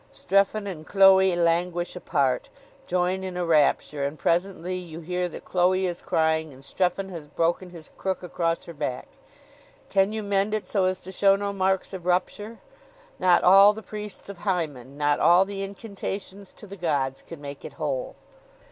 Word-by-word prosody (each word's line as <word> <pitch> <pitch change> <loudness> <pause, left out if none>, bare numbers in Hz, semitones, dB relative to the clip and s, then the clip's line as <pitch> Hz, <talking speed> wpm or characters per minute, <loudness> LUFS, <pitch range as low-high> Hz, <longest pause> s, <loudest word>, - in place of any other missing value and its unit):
Strephon 200 +2 +1
and 165 -6 -7
Chloe 190 -2 +6
languish 175 +1 0
apart; 140 -7 0 0.4
join 180 +1 0
in 185 -1 -5
a 180 - -1
rapture: 150 -2 +2
and 140 +2 -3
presently 180 +1 -1
you 170 -3 -7
hear 180 +2 -2
that - - -10
Chloe 185 +1 +2
is 175 -1 -3
crying, 160 -1 0
and 135 0 -15
Strephon 190 +3 -1
has 165 -5 -8
broken 170 +4 -1
his 170 -3 -12
crook 190 -1 -3
across 165 -1 -1
her 170 - -9
back. 145 -5 -4 0.8
Can 195 +1 +2
you 220 0 -3
mend 200 +1 +1
it 215 - -4
so 195 -3 +1
as 185 0 0
to 190 - -9
show 195 +1 +4
no 200 0 -3
marks 190 0 0
of 180 -2 -7
rupture? 205 +5 -1 0.6
Not 180 -1 +4
all 195 +3 +8
the 220 +1 -9
priests 210 0 -8
of 200 -3 -9
Hymen, 145 - -3
not 145 0 +1
all 175 +3 +5
the 195 0 -6
incantations 200 -1 -6
to - - -13
the 200 0 -10
gods, 140 -6 -1
can 165 - -11
make 140 -1 -9
it - - -8
whole! - - -3
180 Hz, 175 wpm, -25 LUFS, 165-195 Hz, 0.8 s, all